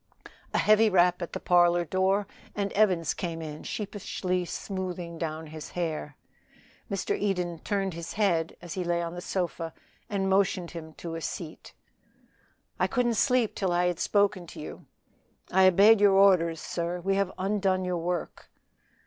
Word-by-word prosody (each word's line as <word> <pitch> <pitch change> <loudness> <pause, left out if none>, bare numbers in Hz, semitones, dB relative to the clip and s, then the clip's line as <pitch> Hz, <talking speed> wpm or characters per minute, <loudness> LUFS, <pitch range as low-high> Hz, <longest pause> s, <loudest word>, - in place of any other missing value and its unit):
A - - 0
heavy 215 +1 +5
rap 180 -1 +3
at 170 - -5
the - - -3
parlor 175 -1 +4
door, 190 +3 +1 0.3
and 200 -1 -1
Evans 185 -7 +2
came 170 -2 -4
in 155 -2 -7
sheepishly 185 -3 -3
smoothing 180 -3 -5
down 160 -1 -3
his 155 0 -8
hair. 155 -4 -3 0.7
Mr. 195 -1 -1
Eden 180 -4 -1
turned 195 -1 -1
his 170 0 -6
head 175 -6 +1
as 175 - -6
he 185 - -2
lay 170 0 0
on 170 0 -4
the 175 - -6
sofa 170 -3 -3 0.3
and 195 -2 -1
motioned 190 -2 +1
him 160 -2 -8
to 165 +1 -7
a 165 - -5
seat. 160 0 -6 1.1
"I - - +3
couldn't 245 -3 +1
sleep 245 0 +2
till 190 -3 -1
I 175 +1 +2
had 180 -2 0
spoken 200 -3 +1
to - - -10
you. 150 - -9 0.6
I 190 +1 +6
obeyed 200 +4 +6
your 200 -1 +6
orders, 180 -4 +4
sir. 170 +2 -3
We 195 +3 0
have 195 -1 +1
undone 190 -1 0
your 180 -1 -1
work." 175 0 -4
180 Hz, 165 wpm, -28 LUFS, 170-195 Hz, 1.1 s, I